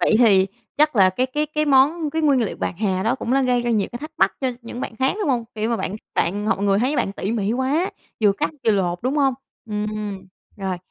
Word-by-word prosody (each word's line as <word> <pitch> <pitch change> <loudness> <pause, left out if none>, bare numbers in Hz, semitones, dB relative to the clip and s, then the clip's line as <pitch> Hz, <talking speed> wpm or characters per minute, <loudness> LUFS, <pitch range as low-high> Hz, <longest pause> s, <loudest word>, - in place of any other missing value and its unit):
Vậy - - +3
thì 195 -6 +5 0.3
chắc 300 -3 +3
là 190 -2 +6
cái 250 +8 0
cái 295 +4 -1
cái 305 0 -1
món 295 +3 +3
cái 320 +2 -1
nguyên 280 -4 +4
liệu 220 - -3
bạc - - -3
hà 190 -3 0
đó 225 +5 +1
cũng 255 -2 -3
là 270 +1 +3
gây 250 -2 +2
ra 240 - -1
nhiều 210 -4 +1
thắc 305 +2 -7
mắc 195 - +3
cho 265 - +1
những 235 +2 -7
bạn 225 - -5
khác, 265 +2 +2
đúng 405 - 0
hông? 245 -4 +1
Kiểu 220 +1 -1
mà 235 - +1
bạn 205 - -3 0.2
bạn 205 +5 0
hoặc - - +1
người 200 0 +2
thấy 260 +6 +1
bạn 195 - 0
tỉ 200 +2 -3
mỉ 215 -2 0
quá, 275 +9 0 0.3
vừa 205 -2 +5
cắt 295 +9 -2
vừa 225 - +4
lột, 180 -3 0
đúng 260 +4 0
hông? 275 -3 +3 0.3
Ừm. 210 -1 -2 0.7
Rồi. 190 -2 -3
235 Hz, 255 wpm, -22 LUFS, 205-275 Hz, 0.7 s, là